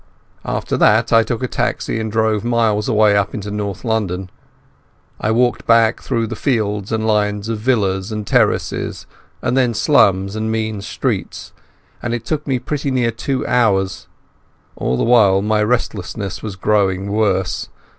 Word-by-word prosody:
After - - -2
that 110 +3 +3
I 115 - +7
took 115 +2 -3
a - - 0
taxi 120 -2 -2
and 110 -1 -3
drove 110 -1 +1
miles 115 -2 +1
away 105 -2 +4
up 100 -1 0
into 105 -1 -5
North 100 0 -4
London. 95 -5 -2 0.9
I 105 - -1
walked 120 0 +1
back 115 0 +4
through 115 -1 -1
fields 110 -4 -1
and 110 -1 -1
lines 105 -1 0
of 115 -2 -2
villas 105 -4 0
and 105 -1 -4
terraces - - 0 0.4
and - - 0
then 125 -3 +2
slums 100 -7 +3
and 110 0 -2
mean 110 -2 -2
streets, 100 - -4 0.5
and 120 0 -2
it 120 - -6
took 150 -1 -3
me 135 -2 +1
pretty 140 +3 -3
nearly 125 -3 +1
two 130 +3 -2
hours. 100 -6 +1 0.7
All 65 +1 -1
the - - 0
while 105 -5 +4
my 105 0 +1
restlessness 105 -3 -2
was 105 -3 -5
growing 95 -1 0
worse. 100 -3 0
110 Hz, 155 wpm, -18 LUFS, 100-115 Hz, 0.9 s, I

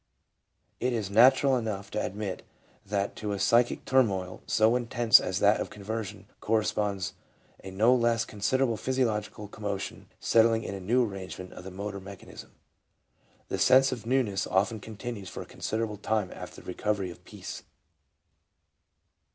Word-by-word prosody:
It 125 0 0
is 105 -4 -2
natural 130 +5 +6
enough 105 -4 -3
to 105 - -1
ad 95 - -4
mit 105 -3 -4 0.4
that 100 0 -2
to 105 -1 -3
a 100 - -3
psychic 120 +5 +3
turmoil 95 -9 +1
so 110 +2 +4
intense 120 -1 +5
as 95 - -2
that 105 +1 +4
of - - -3
conversion 105 -1 -6
corresponds 105 -3 0 0.5
a 95 - -7
no 110 +6 +4
less 115 -2 +2
considerable 115 +3 0
physiological 115 -5 -1
commotion 100 -1 -5
settling 115 0 +4
in - - -5
a 100 - -5
new 120 +7 +2
arrangement 95 -3 -7
of - - -10
the 95 - -7
motor 100 +1 -5
mechanism. 100 0 -11 1.0
The - - -2
sense 135 +1 +6
of 115 -3 -5
newness 115 -7 +1
often 105 +4 +1
continues 110 -2 -7
for - - -6
a - - -15
considerable 110 -1 -3
time 105 -2 -1
after - - -9
the - - -18
recovery 95 0 -1
of - - -14
peace. - - -8
105 Hz, 150 wpm, -28 LUFS, 100-115 Hz, 1.0 s, natural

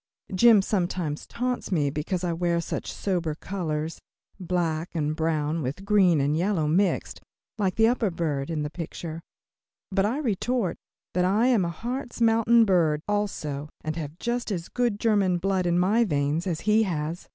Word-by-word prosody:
Jim 215 +1 +6
sometimes 175 -6 -2
taunts 250 -2 -3
me 145 -6 +1
because 165 +5 -3
I 175 -1 0
wear 170 0 0
such 170 - -4
sober 175 -6 -2
colors 160 -3 -3 0.4
black 175 -2 -2
and 155 -1 0
brown 160 0 0
with 145 +9 -4
green 190 -6 +4
and 140 +2 +1
yellow 175 -1 +1
mixed 185 +5 0 0.4
like 190 -3 +1
the 225 0 +5
upper 235 -3 +1
bird 155 -5 -2
in 155 -2 -2
the 150 - -4
picture 165 -1 -6 0.7
but 195 0 +2
I 240 +6 -1
retort 245 - -1 0.4
that 180 - +2
I 200 +6 +3
am 230 -7 +3
a 170 - -1
Hartz 240 - -5
Mountain 230 0 +5
bird, 160 -6 +2
also, 155 -9 -2
and 155 0 -3
have 155 -1 -6
just 240 +4 -2
as 175 -4 -3
good 240 -4 0
German 205 -5 +2
blood 185 0 0
in 175 0 +2
my 205 +6 +3
veins 150 -1 0
as 165 -4 -2
he 215 +1 +3
has. 165 -4 -2
180 Hz, 170 wpm, -26 LUFS, 155-210 Hz, 0.7 s, Jim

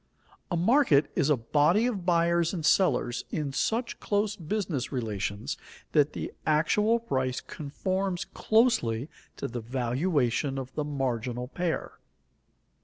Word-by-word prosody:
_A 175 - +1
market 175 - +4
is 140 - +2
a 150 - +4
body 150 - +3
of 200 -8 -2
buyers 170 0 +2
and 160 -4 -3
sellers 125 -10 +2
in 145 -3 -3
such 225 - -1
close 205 0 0
business 170 - -3
relations 110 +3 -3 0.3
that 150 -1 +3
the - - -5
actual 185 +9 +3
price 130 - -1
conforms 185 +5 -3
closely 220 - +2 0.3
to - - -3
the 120 0 -5
valuation 130 +2 0
of 130 -1 -6
the 150 - -1
marginal 125 -4 -2
pair. 170 +4 -3
150 Hz, 125 wpm, -28 LUFS, 130-185 Hz, 0.3 s, market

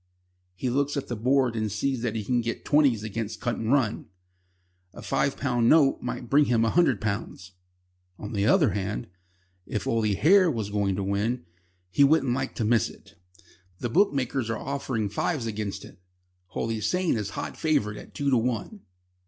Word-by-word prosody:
He 125 +7 -2
looks 140 +2 0
at 140 - -4
the 120 - -2
board 125 +1 +2
and 110 -2 -1
sees 125 +5 -1
that 115 -2 -2
he 110 - -2
can 120 +3 +1
get 115 0 -4
twenties 140 -8 +3
against 110 0 -4
Cutandrun. 120 0 0 0.9
A - - -10
five 140 - 0
pound 120 -4 +1
note 150 -4 +4
might 120 - -5
bring 145 +4 +4
him 115 -3 +2
a 115 - +1
hundred 150 - +3
pounds. 100 -3 -4 0.7
On 105 +2 -7
the 100 0 +1
other - - +4
hand, 100 +1 -3 0.6
if 105 - -3
Oily 110 -3 +1
Hair 180 - +5
was 110 -8 -3
going 100 -2 0
to 100 - -2
win, 100 +2 -1 0.5
he 140 - +4
wouldn't 140 -3 +3
like 130 +1 -3
to 115 - -1
miss 115 0 +2
it. - - -16 0.6
The 120 - -3
bookmakers 135 - +1
are 115 - -1
offering 130 -6 -3
fives 120 - -2
against 105 -2 -4
it. - - -16 0.5
Holy 110 +3 -3
Saint 180 - +1
is 105 -3 -3
hot - - -4
favourite 105 -10 0
at - - -14
two 140 -1 0
to 130 - +4
one. 120 - -2
115 Hz, 175 wpm, -26 LUFS, 105-140 Hz, 0.9 s, Hair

